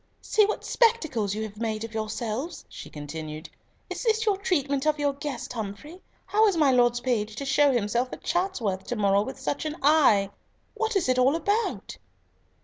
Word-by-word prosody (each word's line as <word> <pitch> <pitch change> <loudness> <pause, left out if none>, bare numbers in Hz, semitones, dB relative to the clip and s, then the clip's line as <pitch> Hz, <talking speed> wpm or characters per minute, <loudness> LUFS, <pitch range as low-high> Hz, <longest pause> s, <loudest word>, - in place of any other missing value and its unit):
"See 425 -2 +3
what 425 - -3
spectacles 315 - +1
you 220 - -3
have 215 0 -8
made 220 -1 -2
of 225 0 -7
yourselves!" 220 +7 -4
she - - -10
continued. 155 +1 -7 0.4
"Is - - -5
this 445 -1 +1
your 415 -2 +3
treatment 290 -8 0
of 305 0 +2
your 290 -1 0
guest, 275 -4 -5
Humfrey? 230 - -7 0.2
How 435 +1 +3
is 390 -5 +1
my 295 -4 +4
Lord's 240 -1 +3
page 220 -4 -1
to 275 - -5
show 285 +1 +4
himself 240 +1 0
at - - -9
Chatsworth 270 - -1
to 245 - -3
morrow 200 -2 +3
with 265 +6 -5
such 285 - -2
an 310 -1 -3
eye? 260 -10 +4 0.4
What 445 0 -2
is 375 -7 +1
it 255 0 +2
all 265 +4 +4
about?" 410 +7 -1
260 Hz, 185 wpm, -26 LUFS, 215-330 Hz, 0.4 s, my